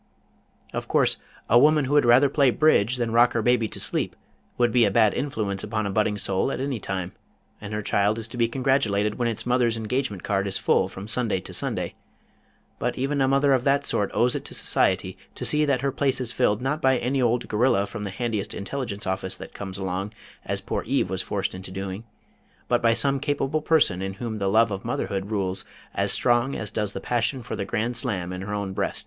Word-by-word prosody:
Of - - -4
course, - - +2 0.3
a 120 - +6
woman 150 +1 +4
who 135 - -2
would 145 -3 +5
rather 125 +4 +6
play 140 -1 +3
Bridge 125 -4 +3
than 120 -2 -2
rock 120 +1 +5
her 115 - 0
baby 120 -1 +3
to - - -7
sleep - - -2 0.4
would 120 -1 +3
be 120 +1 +4
a 105 - +4
bad 110 0 +4
influence 105 -8 -2
upon 110 0 -2
a 100 - -2
budding 105 0 +1
soul 95 +5 0
at - - -3
any 135 -3 -2
time, 95 -2 -4 0.5
and 105 0 -7
her 105 0 -3
child 100 +2 +1
is 115 -1 -4
to - - -9
be 115 -1 +3
congratulated 115 -5 +1
when 120 - +1
its 115 -2 -3
mother's 120 -2 +2
engagement 110 -3 -2
card 100 -1 0
is 95 - -1
full - - +2
from 95 +2 -8
Sunday 110 -4 0
to - - -10
Sunday, - - -3 0.9
but - - -2
even 140 +2 0
a 135 - +3
mother 140 +1 +3
of 130 -2 +2
that 140 +1 +2
sort 100 - 0
owes 125 +1 +2
it - - -3
to - - -4
society 95 0 +1 0.2
to - - -4
see 150 0 +3
that 135 -4 +1
her 140 0 0
place 135 -1 +1
is 125 -2 -4
filled 115 -2 +1
not 150 +4 -1
by 130 -1 +4
any 130 +3 0
old 120 0 +1
gorilla 105 -2 +2
from 105 0 -7
the 100 - -3
handiest 110 +1 -3
intelligence 105 -1 -4
office 95 0 -2
that - - -10
comes 95 -1 -6
along 95 +1 -3 0.3
as - - -3
poor - - -2
Eve 130 -8 +1
was 95 0 -1
forced 100 0 -2
into 95 0 -7
doing, 95 +3 -5 0.6
but - - +2
by 115 -1 +4
some 140 +1 +1
capable 145 +1 -1
person 150 - +2
in 95 0 -3
whom 110 +1 -5
the 100 -1 0
love 110 +2 +4
of 95 -1 -4
motherhood 95 0 -2
rules 95 -3 -1 0.3
as - - 0
strong 120 +3 +2
as 105 - -5
does 105 -2 -1
the - - -4
passion 120 +2 -1
for 125 - -5
the 100 - -3
grand 115 +5 -1
slam 95 -8 -2
in 90 - -5
her 100 +1 -5
own 100 -2 -3
breast. - - -2
115 Hz, 225 wpm, -25 LUFS, 100-130 Hz, 0.9 s, a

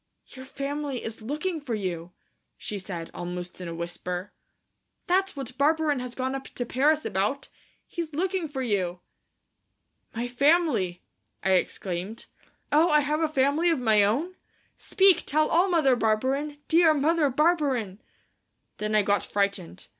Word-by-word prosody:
"Your 260 0 -10
family 280 -1 -4
is 225 0 -6
looking 305 +8 -3
for 250 -6 -3
you," 180 -4 -4 0.5
she 205 - -5
said, 175 -3 -6
almost 180 +1 -6
in 180 - -5
a 165 - -5
whisper. 175 +2 -5 0.7
"That's 385 +1 +1
what 265 -3 -6
Barberin 300 -1 +2
has 250 -1 -6
gone 260 0 -2
up 270 0 -5
to 245 - -2
Paris 295 +6 +2
about. 210 +9 -1 0.4
He's 335 -2 -5
looking 360 +2 -1
for 265 -2 -3
you." 185 -6 -1 1.1
"My 235 +2 -2
family," 245 - +2 0.4
I 190 - +2
exclaimed. 185 +2 -1 0.5
"Oh, 315 +3 +4
have 300 +2 0
I - - +3
a - - +1
family 295 +3 +2
of 330 - +2
my 220 -4 +4
own? 285 - 0 0.4
Speak, 385 -3 +3
tell 305 +1 +2
all, 355 +4 +3
Mother 310 -7 +4
Barberin, 260 +7 0
dear 325 -1 +5
Mother 305 +1 +2
Barberin!" 270 - +1 0.8
Then 215 0 -1
I 210 - +5
got 205 +1 +2
frightened. 200 - -2
265 Hz, 145 wpm, -26 LUFS, 205-310 Hz, 1.1 s, dear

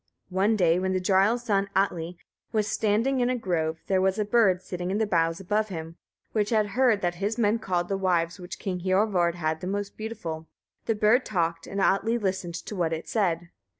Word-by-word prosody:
One 195 +4 +2
day 175 -3 +3
when 190 0 0
the 185 - +1
jarl's 195 +6 +2
son 200 -3 +1
Atli 175 -3 0 0.3
was 215 -2 +1
standing 225 +5 +1
in 245 0 +2
a 255 - +1
grove, 165 -7 -1
there 190 -1 +2
was 190 +1 +2
a 210 - 0
bird 200 -4 +3
sitting 180 -1 -4
in 195 - 0
the 220 - +2
boughs 165 -4 +1
above 210 +3 0
him, 165 -2 -6 0.4
which 210 -2 0
had 215 -3 +2
heard 230 -1 +3
that 175 -1 0
his 210 +4 -1
men 225 0 +2
called 180 -4 -1
the 195 - -1
wives 175 -2 0
which 180 0 -7
King 185 -2 -3
Hiorvard 185 -2 +2
had 160 -2 -2
the 180 - -4
most 200 +1 -3
beautiful. 175 -8 -6 0.4
The 225 - +2
bird 215 +5 +4
talked, 170 -4 -1
and 200 - -4
Atli 195 +4 +2
listened 190 -5 -2
to 190 +5 -6
what 170 -3 0
it 160 - -5
said. 175 -5 0
190 Hz, 210 wpm, -26 LUFS, 175-215 Hz, 0.4 s, bird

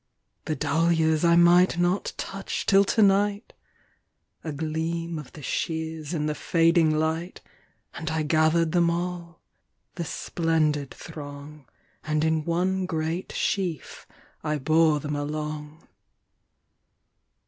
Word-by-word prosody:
The 155 - -1
dahlias 160 +1 +1
I 170 0 +5
might 175 +1 +5
not 175 +3 0
touch 195 0 -4
till 195 0 +5
to 220 +2 +3
night!A 200 -4 -3
gleam 160 +2 -3
of 150 - -11
the 150 - -11
shears 160 +1 -3
in 155 -4 -1
the 150 - 0
fading 165 +1 +3
light, 160 +3 -2 0.5
And 160 -2 -5
I 160 0 -1
gathered 160 +2 +2
them 170 0 +3
all,—the 170 - -7
splendid 155 -4 -1
throng, 145 -1 -10 0.4
And 155 0 0
in 160 -1 +1
one 185 +2 0
great 165 +1 -3
sheaf 180 -7 -3 0.4
I 150 -1 -1
bore 155 +1 +3
them 150 +1 -4
along.. 150 +1 -5
160 Hz, 115 wpm, -26 LUFS, 150-170 Hz, 0.5 s, I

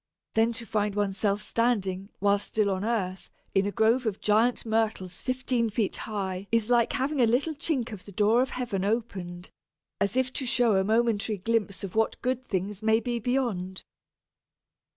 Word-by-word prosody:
Then 225 +1 +3
to 230 0 -4
find 210 -1 -1
oneself 205 0 0
standing 200 -6 0
(while 200 +1 +3
still 205 0 0
on 190 0 -2
earth) 195 -5 -2 0.2
in 195 +1 +3
a - - -1
grove 225 +3 +2
of 205 -2 -2
giant 225 +4 +2
Myrtles 220 -5 -1
fifteen 255 -2 0
feet 215 -2 -1
high 195 -2 -4
is 230 0 +1
like 240 -1 +3
having 275 +1 0
a 235 - +5
little 265 +8 +1
chink 275 -5 -1
of 205 -4 -8
the 200 - -10
door 210 +5 +3
of 260 - 0
heaven 235 -7 -2
opened, 195 -5 -3 0.5
as 200 +5 +1
if 260 0 +1
to 265 - -2
show 240 -3 +3
a 190 - +3
momentary 220 0 +1
glimpse 205 -1 -1
of 195 - -5
what 220 0 +1
good 255 0 0
things 195 +1 -2
may 220 0 +3
be 240 0 -2
beyond! 220 -7 -1
220 Hz, 175 wpm, -27 LUFS, 200-240 Hz, 0.5 s, a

